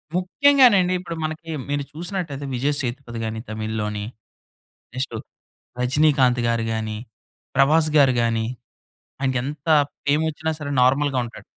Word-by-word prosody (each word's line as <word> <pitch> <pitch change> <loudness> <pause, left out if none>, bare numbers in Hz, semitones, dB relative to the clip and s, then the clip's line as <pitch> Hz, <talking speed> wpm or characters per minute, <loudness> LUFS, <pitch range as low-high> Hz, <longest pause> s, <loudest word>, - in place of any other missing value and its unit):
ముఖ్యంగానండి 205 -2 +4
ఇప్పుడు 170 -2 -6
మనకి, 160 +1 -5 0.2
మీరు 145 0 -1
చూసినట్టయితే 165 -4 -5
'విజయ్ 140 +4 0
సేతుపతి' 120 -2 -5
గాని 110 0 -4
తమిళ్‌లోని, 110 -1 -3 0.9
నెక్స్టు 130 -3 -3 0.6
'రజినీకాంత్' 130 -2 +3
గారు 115 -1 +1
గాని, 110 -1 -3 0.6
'ప్రభాస్' 155 +3 +4
గారు 135 -3 +5
గాని 115 -1 0 0.8
ఆయనకెంత 135 +3 -2 0.4
ఫేమోచ్చినా 160 +2 0
సరే 145 -1 -4
నార్మల్‌గా 135 +1 +3
ఉంటాడు. 115 - -11
140 Hz, 110 wpm, -22 LUFS, 120-155 Hz, 0.9 s, గారు